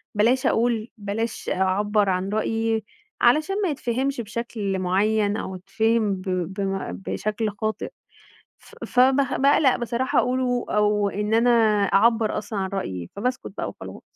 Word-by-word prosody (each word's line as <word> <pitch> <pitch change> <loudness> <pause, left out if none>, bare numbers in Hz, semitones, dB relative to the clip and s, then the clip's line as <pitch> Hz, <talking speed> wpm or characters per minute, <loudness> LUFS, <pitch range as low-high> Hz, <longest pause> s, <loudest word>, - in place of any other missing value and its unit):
بلاش 240 +5 +2
أقول، 230 -1 +1
بلاش 210 +2 -4
أعبّر 200 +2 +1
عن 185 +1 -1
رأيي 225 +1 0 0.4
علشان 305 +10 +3
ما 375 - +1
يتفهِمش 265 -1 -2
بشكل 215 -3 -3
مُعين 205 +3 +1
أو 190 - -5
يتفهِم 210 +2 0
ب 185 - -9 0.3
بم 195 - -3 0.2
بشكل 210 - -2
خاطئ، 215 +2 -3 0.7
ف - - -18
فب 260 +1 +4 0.3
باقلق 275 -1 +4
بصراحة 240 +2 0
أقوله 250 -1 0
أو 210 -1 +2
إن 210 +2 -2
أنا 230 +2 +4 0.4
أعبّر 220 +2 +3
أصلًا 205 -1 -5
عن 190 - -2
رأيي، 90 - -4
فباسكت 250 +5 -3
بقى - - -2
وخلاص. - - -10
215 Hz, 135 wpm, -24 LUFS, 200-240 Hz, 0.7 s, فب